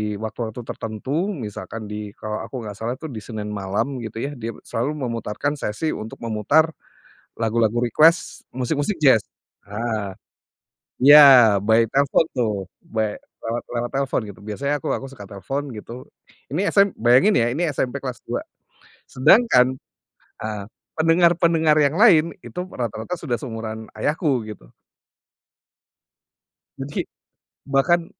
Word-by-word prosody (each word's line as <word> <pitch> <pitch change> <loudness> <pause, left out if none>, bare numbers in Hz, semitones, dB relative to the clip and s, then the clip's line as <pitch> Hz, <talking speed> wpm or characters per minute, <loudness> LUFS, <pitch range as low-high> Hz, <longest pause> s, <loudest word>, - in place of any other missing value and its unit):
waktu-waktu 110 +2 -5
tertentu 130 - -3
misalkan 110 - -6
di 105 0 -5
kalau 110 0 -5
aku - - -8
nggak 105 - -6
salah 115 +3 -2
tuh 155 +3 -8
di 115 - -6
Senin 105 -1 -6
malam 105 +7 -2
gitu 110 -3 -7
ya 140 - -3
dia 115 -5 -6
selalu 130 +7 -2
memutarkan 115 +5 -3
sesi 120 +10 -2
untuk 110 +2 -7
memutar, 115 +9 +2 0.7
lagu-lagu 115 0 +1
request 155 +9 +3
musik-musik 145 - -1
jazz, 130 -6 +7 0.5
ah, 105 -1 -3 0.9
ya 135 -7 +9
by 110 +3 +4
telepon 140 +3 +3
tuh 115 -4 0 0.3
by 110 -2 -3 0.2
lewat 115 +1 -3
lewat 120 0 -2
telepon 135 -2 0
gitu 95 - -17
biasanya 140 +7 -2
aku - - -6
aku 135 0 -7
suka 105 -7 -11
telepon 135 +7 -5
gitu, 120 +4 -9 0.5
ini 185 - +1
sm 200 -1 +4
bayangin 125 - +4
ya 115 - +3
ini 165 +7 0
SMP 130 +2 -1
kelas 130 -3 -6
2 - - -3 0.7
sedangkan, 130 - +4 0.7
eee, 105 -2 -4 0.4
pendengar-pendengar 165 -1 +4
yang 145 -1 +3
lain 170 -10 +7 0.2
itu 180 +1 -6
rata-rata 120 - -4
sudah 145 -9 -3
seumuran 110 -3 -6
ayahku 140 +2 0
gitu. - - -12 2.1
Jadi, 135 +2 -4 0.6
bahkan 145 +5 +2
125 Hz, 130 wpm, -22 LUFS, 110-145 Hz, 2.1 s, ya